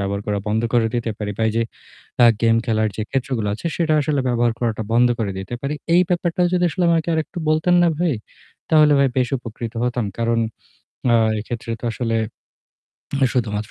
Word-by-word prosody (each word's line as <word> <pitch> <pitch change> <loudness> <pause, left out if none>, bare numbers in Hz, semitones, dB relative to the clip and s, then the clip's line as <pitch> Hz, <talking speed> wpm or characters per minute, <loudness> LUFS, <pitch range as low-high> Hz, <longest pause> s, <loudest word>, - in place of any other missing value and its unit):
ব্যবহার 100 0 -2
করা 105 -1 0
বন্ধ 110 +2 +1
করে 120 -2 +3
দিতে 120 -1 -1
পারি 105 -1 -3
বা 115 - 0
এইযে 115 +1 0 0.6
অ্যা 120 -1 +7
game 115 0 +4
খেলার 110 -2 +1
যে 110 - -2
ক্ষেত্রগুলো 125 -5 -1
আছে 140 - -6
সেটা 160 -2 +1
আসলে 145 -1 0
ব্যবহার 120 -1 +2
করাটা 115 -2 -1
বন্ধ 120 +1 +5
করে 100 -4 -1
দিতে 95 +5 -6
পারি। 140 +2 -2 0.2
এই 180 - +6
ব্যাপারটা 175 -1 0
যদি 180 -1 +2
আসলে 180 0 -1
আমাকে 165 0 +1
আর 160 - +1
একটু 180 - -9
বলতেন 155 +3 +3
না 175 - +4
ভাই, 170 -5 +1 0.6
তাহলে 155 -2 +6
ভাই 140 - +4
বেশ 125 -1 +2
উপকৃত 115 -1 -7
হতাম। 125 -2 0
কারণ 115 0 +1 0.7
আ - - +5 0.3
এক্ষেত্রে 115 +1 -6
তো - - -2
আসলে 115 -2 -1 1.2
শুধুমাত্র 105 -4 -2
120 Hz, 190 wpm, -21 LUFS, 110-150 Hz, 1.2 s, অ্যা